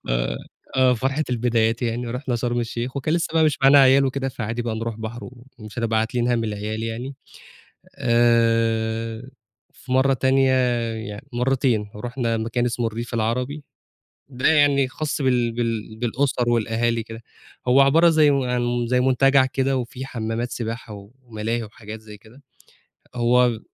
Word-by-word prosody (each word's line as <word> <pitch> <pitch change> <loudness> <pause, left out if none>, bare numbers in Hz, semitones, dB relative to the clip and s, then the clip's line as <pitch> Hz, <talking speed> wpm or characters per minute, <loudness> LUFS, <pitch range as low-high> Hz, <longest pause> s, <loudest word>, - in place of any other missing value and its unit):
ف - - -1 0.7
آه 130 -1 +4
فرحة 135 +6 -1
البدايات 115 -1 +1
يعني. 120 +1 -2
ورُحنا 125 +1 -3
شرم 120 0 -1
الشيخ، 120 +3 -4
وكان 155 +4 0
لسه 170 - 0
بقى 160 -1 +4
مش 150 - +1
معانا 140 +1 +7
عيال 135 0 +6
وكده، 135 0 -2
فعادي 115 -1 -4
بقى 115 -2 -3
نروح 115 -1 -4
بحر، 115 +2 -7
و 125 0 -12
ومش 110 +1 -10
هنبقى 115 -1 +1
عاتلين 120 +2 -1
هَم 115 -2 +1
العيال 110 +1 -4
يعني، 120 +4 -5 0.8
آآ 115 0 +1 0.4
وفي 125 0 -9
مرّة 135 +1 +3
تانية، 130 +1 +2 0.5
يعني 105 0 -8
مرتين، 125 -4 0
رُحنا 120 +1 -2
مكان 115 +2 -1
اسمه 120 0 -1
الريف 115 +2 -5
العربي، 125 +6 -2 0.7
ده 130 0 0
يعني 145 -3 +4
خاص 150 +2 -3
بال 125 -3 +2
بال 115 -2 -3
بالأسر 125 0 0
والأهالي 115 0 0
كده، 115 +1 -10 0.4
هو 130 +2 +6
عبارة 165 +5 +5
زي 155 -2 +4
و 135 -2 +1
عن 125 0 0
م 120 0 -1
زي 125 +1 +2
منتجع 130 +1 +4
كده، 135 0 0
وفيه 125 +2 -5
حمَّامات 115 -1 -4
سباحة، 115 -1 -5
و 100 0 -11
وملاهي 115 0 -3
وحاجات 110 0 -10
زي 105 -1 -12
كده. 115 +7 -19 0.7
هو 120 -1 +3
120 Hz, 160 wpm, -22 LUFS, 115-130 Hz, 0.8 s, معانا